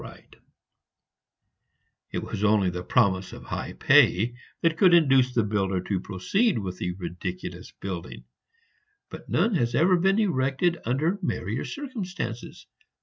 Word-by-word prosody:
It - - -4
was 100 - -5
only 105 -3 +3
the 90 0 -5
promise 95 -2 +1
of - - -10
high - - -5
pay 110 +7 +4 0.3
that 165 -1 +3
could 175 +1 +5
induce 135 -6 +4
the 120 -2 +1
builder 100 -3 0
to 95 +1 -2
proceed 180 - 0
with 95 -4 -5
the 90 - -2
ridiculous 90 0 -6
building; 85 -11 -6 0.9
but - - -10
none 230 - +2
has 120 -9 0
ever 180 +3 +4
been 195 +3 +2
erected 170 -3 +1
under 155 +11 0
merrier 110 - -3
circumstances. 190 - -6
120 Hz, 130 wpm, -26 LUFS, -, 0.9 s, could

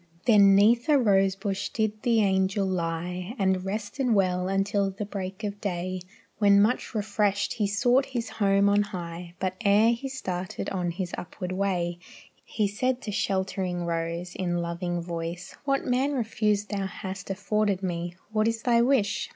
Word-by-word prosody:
Then 200 -4 +7
'neath 230 +7 +4
a 295 - +6
rose 195 -6 +3
bush 195 -1 -3
did 215 -1 -2
the 230 -2 +3
angel 190 0 +2
lie, 180 +3 -3
And 190 -3 +1
rested 210 +6 -2
well 185 -4 +2
until 195 +1 +1
the 195 +2 -5
break 195 0 -6
of 205 -1 -4
day, 185 -2 -3 0.4
When 200 -1 +6
much 225 +3 +1
refreshed 205 -1 0
he 210 -3 0
sought 245 +6 +2
his 240 -3 -3
home 200 0 +4
on 205 0 +4
high, 175 -3 -6
But 185 -1 -2
ere 210 +3 +5
he 270 +3 -5
started 190 -6 -4
on 180 -3 -1
his 175 +1 -4
upward 180 +1 -6
way, 180 -3 -1 0.4
He 210 -2 -1
said 250 +5 -1
to 210 - -4
sheltering 190 -3 -1
rose, 170 +1 -3
in 175 -2 -1
loving 175 0 -2
voice, 170 +1 -5
"What 275 -1 +1
man 260 +3 +1
refused 215 -4 0
thou 200 -2 -1
hast 190 -1 -7
afforded 205 0 0
me. 175 -1 -3 0.2
What 215 0 +2
is 230 0 -1
thy 235 -2 +4
wish? 240 -5 +1
195 Hz, 165 wpm, -27 LUFS, 180-215 Hz, 0.4 s, Then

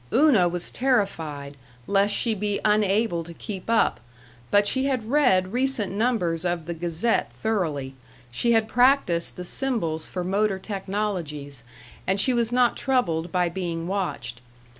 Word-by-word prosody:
Una 240 - +4
was 175 0 -3
terrified 165 - -1 0.3
lest 200 +1 +2
she 225 +2 +1
be 205 0 -2
unable 210 -3 +2
to 170 0 -11
keep 200 +1 -7
up, 230 -1 +2 0.5
but 205 0 +4
she 260 +5 +1
had 255 -5 -2
read 200 -10 +3
recent 250 -6 0
numbers 195 -6 0
of 175 -2 -2
the 170 - -4
Gazette 170 +7 -1
thoroughly, 160 -12 -2 0.4
she 235 - +1
had 225 -1 +2
practised 245 -10 +2
the 180 - -7
symbols 175 -10 -2
for 180 - -4
motor 195 +2 +1
technologies, 190 - -4 0.5
and 190 +1 +1
she 255 +6 +4
was 235 -1 +1
not 245 -1 +3
troubled 175 -12 0
by 180 0 +2
being 170 -1 -4
watched. 140 -12 -3
195 Hz, 145 wpm, -25 LUFS, 170-230 Hz, 0.5 s, Una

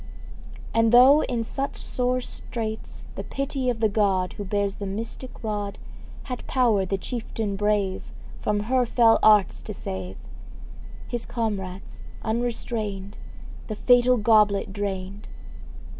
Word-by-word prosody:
And 225 -1 +3
though 260 +5 +8
in 235 -2 -1
such 270 +4 -3
sore 250 0 -1
straits, 220 -3 -6
The - - -5
pity 275 -2 -2
of 235 -2 -2
the 220 - +5
god 195 -3 +1
Who 205 - -6
bears 200 0 -1
the 200 - -4
mystic 230 +6 -6
rod 205 -2 -3 0.5
Had 250 -2 -6
power 230 -7 +3
the 195 - 0
chieftain 220 -2 -4
brave 205 -2 0 0.4
From 210 -1 0
her 250 +3 +1
fell 230 -1 +5
arts 210 -3 +5
to 215 - -7
save; 95 - -6 0.9
His 240 -1 -4
comrades, 195 -5 -4 0.2
unrestrained, 220 -3 -3 0.5
The 215 - -4
fatal 245 +2 +4
goblet 210 -3 +3
drained. 200 0 -4
215 Hz, 130 wpm, -25 LUFS, 200-240 Hz, 0.9 s, though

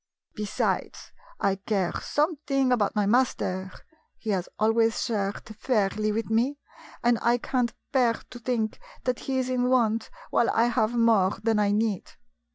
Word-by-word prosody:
Besides, 210 -1 -2 0.3
I 195 0 +1
care 195 -2 -1
something 290 -4 0
about 220 -5 +1
my 210 -1 +2
master. 195 -5 +1 0.5
He 220 - -3
has 185 -3 -1
always 225 +1 +2
shared 205 -3 -2
fairly 215 -3 +1
w - - 0
r - - -1
ith 225 -2 -3
me, 245 +6 +1 0.5
and 235 -1 +3
I 240 +1 +3
can't 245 -1 -1 0.2
bear 250 -4 +3 0.2
to 245 - -9
think 230 -3 -2 0.2
that 250 -1 -1
he 265 -1 -2
is 260 -1 0
in 250 -1 +1
want 230 -3 +2 0.2
while - - +3
I 235 +1 +3
have 230 -1 +1
more 220 -5 +3
than 225 -1 +2
I 205 -1 +3
need. 210 -2 0
225 Hz, 165 wpm, -26 LUFS, 210-250 Hz, 0.5 s, and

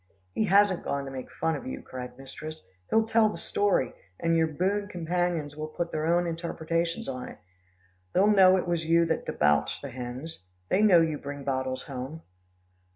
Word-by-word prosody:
"He 220 - +1
hasn't 200 -1 +4
gone 140 0 -2
to 135 - -6
make 130 -1 -7
fun 160 0 -1
of 140 - -7
you," 65 - -5
cried 125 -1 -8
mistress, 155 +4 -9 0.2
"he'll 225 0 +3
tell 225 -1 +4
the - - -6
story, 200 -11 +1 0.3
and 165 0 +2
your 160 -1 +3
boon 190 +6 -1
companions 175 -4 -1
will 155 0 -4
put 170 +2 -4
their 155 0 -1
own 175 +1 +3
interpretation 165 0 -2
on 130 -2 -5
it. - - -11 0.7
They'll 190 - +4
know 190 -3 +6
it 180 - -2
was 170 -2 0
you 170 +1 +5
that 165 -1 -2
debauched 75 - +1
the 140 - -5
hens. 125 - -7 0.3
They 200 - +3
know 190 -6 +7
you 160 -3 0
bring 145 0 -6
bottles 130 -1 -2
home." 140 +4 -7
160 Hz, 185 wpm, -28 LUFS, 135-175 Hz, 0.7 s, know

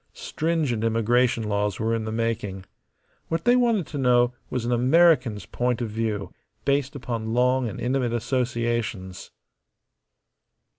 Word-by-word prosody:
Stringent 155 -8 -1
immigration 115 +2 +2
laws 105 -1 -1
were 115 +1 0
in 115 -1 -2
the 110 - -3
making. 110 -4 -2 0.6
What 165 +6 -2
they 245 +1 +5
wanted 235 -7 +2
to 145 +1 -6
know 125 -1 +3 0.2
was 125 -2 -2
an 120 - -1
American's 125 - +3
point 125 0 -1
of 115 -3 -3
view, 110 -2 -3 0.3
based 140 0 0
upon 115 -4 -3
long 125 0 +2
and 100 - -7
intimate 125 0 0
associations. 115 -6 -2
120 Hz, 135 wpm, -25 LUFS, 110-130 Hz, 0.6 s, they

